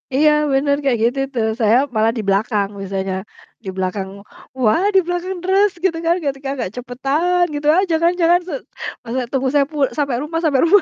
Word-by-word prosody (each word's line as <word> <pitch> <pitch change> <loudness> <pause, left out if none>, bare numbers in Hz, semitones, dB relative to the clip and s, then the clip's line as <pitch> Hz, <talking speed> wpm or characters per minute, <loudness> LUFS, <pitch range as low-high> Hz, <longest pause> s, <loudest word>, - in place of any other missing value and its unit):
Iya, 300 +2 +5 0.2
benar, 280 +1 +2
kayak 265 -4 +2
gitu 245 +4 +1
tuh. 225 -3 0
Saya 235 +5 +4
malah 220 +1 +3
di 220 - -2
belakang 200 0 +1
biasanya. 195 -1 -3 0.5
Di - - -3
belakang 190 +1 -2 0.5
"Wah, 255 - +2
di - - +8
belakang 355 +2 -3
deres, 390 +2 +3
gitu 380 -3 +3
kan, 335 +1 +3
ketika 275 -1 -3
agak 240 - -2
cepetan" 275 +9 0
gitu 290 0 -3
aja 340 +1 +3
kan, 345 +1 +4
"jangan 345 +1 +5
se - - -5 0.5
masa 245 +2 -2
tunggu 265 0 0
saya 285 -1 +4
pul 295 -3 +1
sampai 280 -4 0
rumah 325 +2 -2
sampai 290 -6 +2
rumah." 390 +3 +6
275 Hz, 190 wpm, -19 LUFS, 230-335 Hz, 0.5 s, di